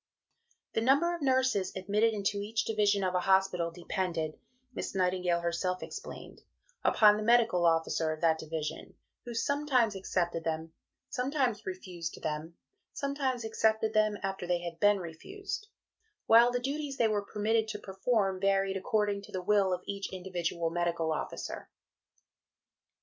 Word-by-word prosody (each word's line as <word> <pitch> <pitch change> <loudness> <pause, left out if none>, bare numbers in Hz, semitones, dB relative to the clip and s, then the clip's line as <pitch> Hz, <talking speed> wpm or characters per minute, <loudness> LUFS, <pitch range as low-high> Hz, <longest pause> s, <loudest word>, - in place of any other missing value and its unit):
" 470 +1 -42
"The 225 - +1
number 280 +8 +3
of 340 - -5
nurses 260 -8 +2
admitted 205 +4 +2
into 200 -1 -1
each 220 +2 -1
division 205 -2 +2
of 185 -1 0
a 180 - +2
hospital 190 -2 +2
depended," 170 -2 -3 0.3
Miss - - -5
Nightingale 180 -2 +1
herself 175 +2 -1
explained, - - -9 0.4
"upon 210 -1 +6
the - - -3
medical 230 -6 +4
officer 165 -1 +1
of 155 - -4
that 160 -1 +3
division, 155 -1 -5 0.3
who 240 -1 -6
sometimes 255 -4 +1
accepted 175 -3 -1
them, 160 0 -3 0.4
sometimes 250 -5 -1
refused 180 -3 -5
them, 155 +2 -3 0.4
sometimes 275 -4 -2
accepted 220 0 +1
them 215 -1 +3
after 195 -2 -3
they 175 -1 +1
had 170 -1 -6
been 205 0 +5
refused; 390 - -6 0.6
while 235 +2 +7
the 245 - 0
duties 275 +2 -3
they 230 - +4
were 210 -1 0
permitted 215 +2 0
to 215 - -4
perform 195 -1 0
varied 195 0 +2
according 205 +1 0
to - - -13
the 185 -1 -4
will 200 -1 +3
of 180 0 -2
each 200 0 -4
individual 175 -3 -2
medical 170 -1 0
officer." - - -5
195 Hz, 150 wpm, -31 LUFS, 175-225 Hz, 0.6 s, while